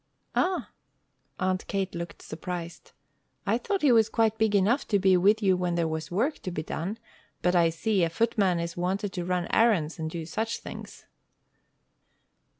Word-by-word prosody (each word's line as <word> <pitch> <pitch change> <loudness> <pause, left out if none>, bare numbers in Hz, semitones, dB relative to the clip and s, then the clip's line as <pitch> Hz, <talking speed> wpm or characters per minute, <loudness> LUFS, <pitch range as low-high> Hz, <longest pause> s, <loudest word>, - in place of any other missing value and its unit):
"Ah!" 365 0 0 0.7
Aunt 185 0 -1
Kate 195 -1 -2
looked 170 0 -6
surprised. 170 +1 -7 0.5
"I - - +1
thought 405 -7 -2
he 285 - +6
was 225 -2 +5
quite 220 -1 +1
big 220 -2 +2
enough 215 +8 +2
to 205 - +3
be 190 -1 +4
with 205 +5 +3
you 190 -2 +4
when 180 -1 -1
there 170 -1 +1
was 160 0 -4
work 235 - 0
to - - -5
be 160 -3 -4
done, 185 +8 -4 0.5
but 180 0 +3
I 170 -1 +5
see, 185 +4 0
a 165 - +2
footman 195 -2 +1
is 170 0 -4
wanted 190 +3 -2
to 180 -2 -3
run 180 -1 0
errands 185 -9 +3
and 160 0 -2
do 165 0 -5
such 225 +7 -2
things." - - -10
185 Hz, 175 wpm, -27 LUFS, 170-220 Hz, 0.7 s, he